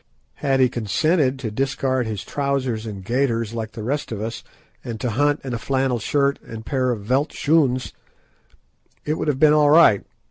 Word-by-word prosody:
Had 135 -1 +1
he 130 - +5
consented 130 - +1
to 120 -5 -5
discard 130 0 -1
his 105 -3 -4
trousers 130 -5 -2
and 100 -3 -7
gaiters 115 -2 0
like 110 -2 -5
the 110 - -7
rest 140 +4 -2
of 110 - -4
us, 110 +2 -5 0.4
and 115 -2 -6
to 120 +1 -2
hunt 145 +6 +1
in 130 -2 -4
a 115 - -2
flannel 130 -1 0
shirt 140 +4 +1
and 115 - -9
a - - -15
pair 130 +1 0
of 115 -4 -2
veldt 130 +7 +1
schoons, 140 -5 +1 1.1
it 155 +1 -1
would - - -2
have 140 -3 0
been 150 0 +6
all 150 -1 +4
right. 145 -11 +6
130 Hz, 190 wpm, -22 LUFS, 115-140 Hz, 1.1 s, been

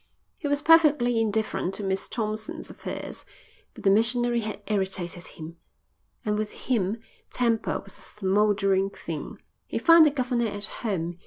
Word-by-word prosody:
He 300 - -3
was 285 +1 0
perfectly 295 -8 +5
indifferent 215 -3 -1
to 210 - -4
Miss 190 0 -2
Thompson's 215 -1 -4
affairs, - - -7 0.5
but - - -11
the 195 - +5
missionary 240 +3 +3
had 215 -2 -4
irritated 190 -4 -2
him, 165 +1 -10 0.7
and 210 0 0
with 215 -1 -2 0.2
him 220 -4 +1 0.3
temper 230 -3 0
was 195 - -12
a - - -16
smouldering 195 -1 +1
thing. - - -7 0.3
He - - -3
found 330 -2 +7
the - - +5
governor 250 -4 0
at 205 -1 -4
home. 175 -7 -3
215 Hz, 150 wpm, -26 LUFS, 195-240 Hz, 0.7 s, found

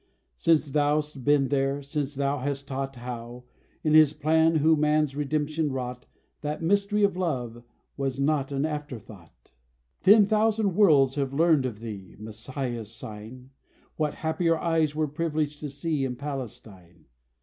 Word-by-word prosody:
Since 155 - +2
thou'st 150 -1 0
been 145 -1 +3
there; 140 0 0
since 145 0 -3
thou 140 +1 0
hast 140 +1 -3
taught 135 0 -4
How, 120 0 -7 0.4
in 155 - +2
His 155 -2 +7
plan, 160 +2 +3
who 160 +1 +4
man's 150 -1 +1
redemption 150 +1 -1
wrought, 125 -1 -5 0.3
That 150 +2 -4
mystery 200 +3 +2
of 200 -3 +3
love 125 -10 -3 0.4
was 135 -1 -2
not 140 -1 +1
an 140 +1 0
afterthought. 125 - -8 0.5
Ten 205 +1 +7
thousand 215 -1 +2
worlds 145 -10 +5
have 135 -1 -1
learned 155 -4 +3
of 110 -3 -8
thee 100 -5 -8
(Messiah's 110 +1 -5
sign), 115 +4 -10 0.4
What 150 -2 -1
happier 165 0 +1
eyes 160 -3 +1
were 155 0 0
privileged 150 -1 -2
to 150 - -5
see 145 +1 -2
In 130 -2 -2
Palestine. 110 - -8
145 Hz, 145 wpm, -26 LUFS, 130-155 Hz, 0.5 s, His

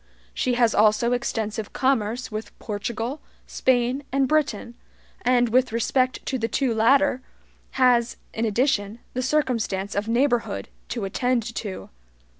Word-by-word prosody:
She 250 -1 0
has 235 -2 +3
also 215 +3 +3
extensive 220 -3 -2
commerce 250 -3 0
with 215 +1 -6
Portugal, 230 +6 -4 0.2
Spain, 250 +1 +1
and 270 0 +2
Britain, 255 -6 0 0.5
and, 245 -1 +3
with 255 +1 +3
respect 255 +3 0
to 260 - -2
the 225 - 0
two 260 0 0
latter, 260 +4 +3 0.5
has, 245 -2 +3 0.2
in 225 - -2
addition, 220 -2 +1 0.2
the 255 - -1
circumstance 235 -8 0
of 205 +2 -2
neighborhood 240 +1 0 0.2
to 230 -5 -3
attend 245 +4 0
to. 205 -4 -6
240 Hz, 130 wpm, -24 LUFS, 220-255 Hz, 0.5 s, has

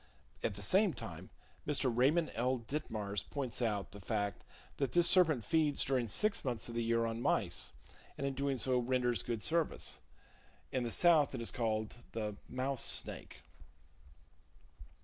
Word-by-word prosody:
At - - -1
the 100 - -5
same 190 - +3
time - - -8 0.4
Mr. 135 -5 +1
Raymond 150 +7 +3
L. 125 +3 +1
Ditmars 110 -6 -3
points 130 -4 -3
out 105 -4 -1
the 100 - -10
fact 100 0 -2 0.3
that 135 -4 -1
this 175 -1 +5
serpent 155 - +4
feeds 155 0 +2
during 130 -3 +1
6 210 - 0
months 120 -4 -2
of 120 - -7
the 115 0 -1
year 115 0 +2
on 115 0 -3
mice, - - +1 0.4
and 140 - -3
in 140 - -1
doing 140 0 -1
so 125 +1 +2
renders 125 -3 +1
good 115 -3 -3
service. 165 -1 0 0.7
In 130 - 0
the 120 - -2
South 155 0 +4
it 120 - -4
is 115 - 0
called 110 -2 -2 0.2
the 105 -2 -3
"Mouse 130 +1 -1
Snake." - - -2
125 Hz, 160 wpm, -35 LUFS, 115-140 Hz, 0.7 s, this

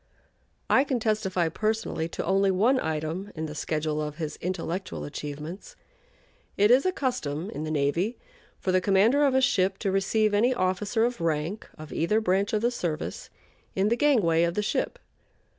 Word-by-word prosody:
I 265 - +5
can 270 -3 -1
testify 210 -6 0
personally 215 -3 -1
to - - -4
only 195 +2 +3
one 225 +8 +3
item 160 +5 -3
in 160 0 -3
the 150 - -6
schedule 155 0 -2
of 150 -1 -4
his 155 -2 -4
intellectual 185 +1 -3
achievements. 150 - -7 0.8
It 205 +3 +5
is 265 +8 +5
a - - +3
custom 190 - -2
in 155 - -5
the - - -4
navy 155 +9 0 0.4
for 185 - -1
the 185 0 +3
commander 205 +9 +4
of 275 -2 +3
a 265 - +4
ship 195 -7 +2
to 195 - -1
receive 205 +2 +1
any 240 +5 +3
officer 205 +4 +1
of 240 -6 -3
rank 165 +5 -2
of 155 0 -9
either 190 +7 +2
branch 195 -1 +1
of 215 - 0
the 240 - +3
service 170 -9 -4 0.5
at 195 +2 +3
the - - +4
gangway 220 - +3
of 170 0 +1
the 210 - 0
ship. - - -1
190 Hz, 175 wpm, -27 LUFS, 160-220 Hz, 0.8 s, I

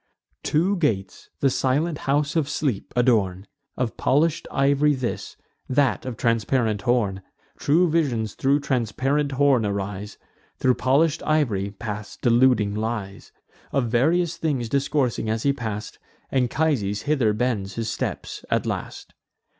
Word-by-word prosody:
Two 180 +6 +1
gates 110 - -2
the 135 - +3
silent 150 +6 0
house 145 +2 +1
of 155 -3 +1
Sleep 135 -10 -2
adorn; 105 -7 +2 0.3
Of 125 -3 -2
polish'd 150 +4 +1
ivory 140 +2 +3
this, 130 -2 -4 0.3
that 135 -1 +1
of 120 -4 -5
transparent 115 -2 +1
horn: 105 -6 +1 0.4
True 165 +5 +3
visions 130 - 0
thro' 140 +2 +2
transparent 135 +2 0
horn 135 -3 +3
arise; 100 0 -4 0.4
Thro' 130 - +3
polish'd 140 +6 +2
ivory 120 -11 +1
pass 105 0 -7
deluding 120 -4 +3
lies. 105 -2 -4 0.4
Of 130 -4 0
various 160 +8 +2
things 135 -8 -1
discoursing 135 -4 0
as 110 0 -1
he 140 - +3
pass'd, 110 -5 -5 0.3
Anchises 125 -6 0
hither 135 -7 +2
bends 105 -4 -1
his 115 -1 -2
steps - - -4
at - - +1
last. - - -5
125 Hz, 130 wpm, -24 LUFS, 110-145 Hz, 0.4 s, the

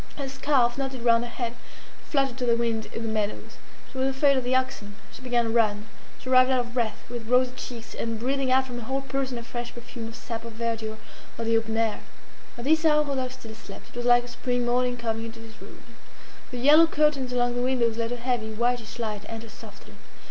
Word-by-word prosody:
Her 280 -2 -3
scarf, 265 -2 +2
knotted 265 -3 -3
round 230 0 +5
her 240 - -5
head, 235 -1 -3 0.6
fluttered 275 -4 +1
to 250 - 0
the 235 - +5
wind 230 -2 -1
in 230 - -6
the - - -2
meadows. 215 -1 -3 0.3
She 265 - -6
was 260 - +2
afraid 275 +1 +3
of 260 - +1
the 250 +1 +1
oxen; 255 -6 -1 0.2
she - - -12
began 245 -2 +1
to 225 - -1
run; 215 -2 +2 0.3
she - - -12
arrived 255 0 +6
out 260 -1 +3
of 240 -1 -8
breath, 230 -4 -1
with 235 -1 -6
rosy 250 +1 +4
cheeks, 235 -2 -8
and 230 -1 -3
breathing 265 +2 0
out 260 +1 +4
from 245 -2 -6
her 230 - -7
whole 270 +3 -1
person 270 -2 -2
a 235 - -6
fresh 240 +1 -5
perfume 235 -1 -7
of 230 - -9
sap, 230 -1 -6
of 230 -1 -8
verdure, 225 -1 -3 0.4
of 230 - -3
the 230 0 +3
open 225 0 0
air. 225 -2 +1 0.6
At 240 - -6
this 315 +4 +3
hour 300 -1 +5
Rodolphe 260 -3 -2
still 225 -2 -9
slept. 220 - -12
It - - -19
was 240 0 -4
like 240 0 +6
a - - -9
spring 245 0 -1
morning 245 0 +1
coming 225 -1 -2
into 230 0 -8
his 225 -1 -13
room. - - -12 0.7
The 250 - -6
yellow 300 +6 +7
curtains 300 -5 +2
along 245 -1 +1
the 245 - 0
windows 245 -3 +1
let 230 0 -1
a - - -1
heavy, 240 -2 -1
whitish 235 0 -1
light 215 -3 -3
enter 225 0 -7
softly. - - -13
240 Hz, 230 wpm, -26 LUFS, 230-260 Hz, 0.7 s, yellow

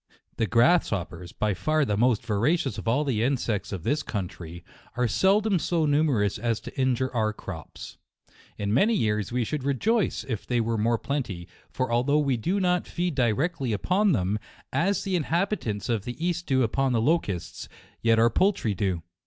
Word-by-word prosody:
The 115 -2 +1
grasshoppers, 100 - +1
by 105 -1 -1
far 155 +8 +1
the 105 - 0
most 120 +1 +2
vora 115 - +2
cious 135 -5 -3
of - - -8
all 130 +6 +2
the 125 -7 0
insects 120 -5 -1
of 95 -5 -5
this 145 +8 0
country, 85 - -6 0.3
are 125 -1 +2
seldom 195 - +2
so 165 -1 0
numerous 145 -10 +1
as 115 0 0
to - - -10
injure 130 0 0
our 110 -2 +1
crops. 90 -6 -9 0.6
In 100 0 -1
many 210 - +3
years 105 - 0
we 125 0 0
should 145 +4 -3
rejoice 195 - 0
if 115 -6 -4
they 120 -1 +1
were 115 0 0
more 115 +2 +1
plenty, 110 -11 -4 0.2
for 130 -2 -2
although 125 +5 +2
we 140 -4 +2
do 175 - -1
not 180 -2 +1
feed 175 -1 -2
di 125 -4 +2
rectly 135 -1 -1
upon 185 - +2
them, 100 - 0 0.3
as 180 +8 +1
the 195 -2 -1
inhabitants 165 - -1
of 115 -5 0
the 120 +2 -6
east 175 0 -2
do 130 -1 +3
upon 130 +3 +1
the 115 - +2
locusts, 110 - -1 0.3
yet 115 0 +3
our 115 +1 +4
poultry 185 - +1
do. 95 -3 -2
125 Hz, 185 wpm, -26 LUFS, 105-155 Hz, 0.6 s, our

